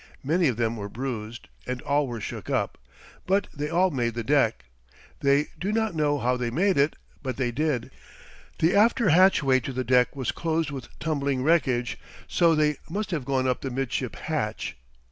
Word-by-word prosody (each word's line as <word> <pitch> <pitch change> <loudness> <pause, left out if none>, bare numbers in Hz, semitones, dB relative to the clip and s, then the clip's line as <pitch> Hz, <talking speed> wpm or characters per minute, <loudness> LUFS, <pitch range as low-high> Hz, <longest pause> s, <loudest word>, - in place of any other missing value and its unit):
Many 165 +5 +2
of 125 -5 0
them 115 -1 0
were 100 -1 -5
bruised 120 -1 -5 0.2
and 125 0 -2
all 145 0 +1
were 120 -2 -5
shook - - -6
up, - - -1 0.5
but 195 +2 +2
they 150 +1 -3
all 180 +3 +3
made 120 -5 -1
the 120 - -2
deck. 115 - +2 0.5
They 140 +1 +2
do 195 +3 -1
not 220 -2 0
know 150 -2 +1
how 125 -1 +1
they 125 -1 -2
made 185 +10 +2
it, 140 +3 +2 0.3
but 130 -2 -4
they 125 -3 0
did. 145 -1 -1 0.7
The 165 +4 +3
after 225 +1 +4
hatchway 155 -6 +5
to 130 - -5
the 130 0 -2
deck 125 +1 +3
was 130 -3 -1
closed 160 -2 -1
with 135 -3 -6
tumbling 140 -4 -1
wreckage, 130 -6 +1 0.3
so 170 -2 +3
they 150 -1 +2
must 200 +4 -3
have 150 -7 -2
gone 130 -1 +1
up 125 - 0
the 135 - -3
midship 130 -1 -2
hatch. 120 - -3
140 Hz, 185 wpm, -26 LUFS, 125-160 Hz, 0.7 s, hatchway